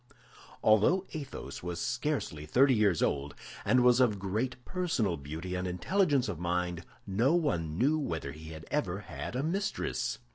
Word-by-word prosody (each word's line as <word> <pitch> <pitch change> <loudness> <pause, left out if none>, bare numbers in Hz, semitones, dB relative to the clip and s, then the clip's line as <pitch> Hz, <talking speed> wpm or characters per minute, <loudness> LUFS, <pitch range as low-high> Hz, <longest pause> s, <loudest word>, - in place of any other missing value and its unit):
Although 110 - +4
Athos 145 -4 -6
was 90 -1 -4
scarcely 75 0 -2
thirty 130 - +5
years 105 -7 +3
old, 70 0 -1 0.3
and 125 -1 +4
was 125 0 +6
of 115 -5 +4
great 105 +7 -2
personal 160 - 0
beauty 80 +5 -6
and 90 0 -2
intelligence 140 - +1
of 95 -7 -4
mind, 90 0 -1 0.2
no 115 - +2
one 85 - 0
knew 145 +8 +3
whether 80 - -3
he 80 +2 -10
had 80 -1 -9
ever 100 -10 -1
had 115 - -6
a 130 - 0
mistress. 195 +6 -1
105 Hz, 155 wpm, -31 LUFS, 85-140 Hz, 0.3 s, was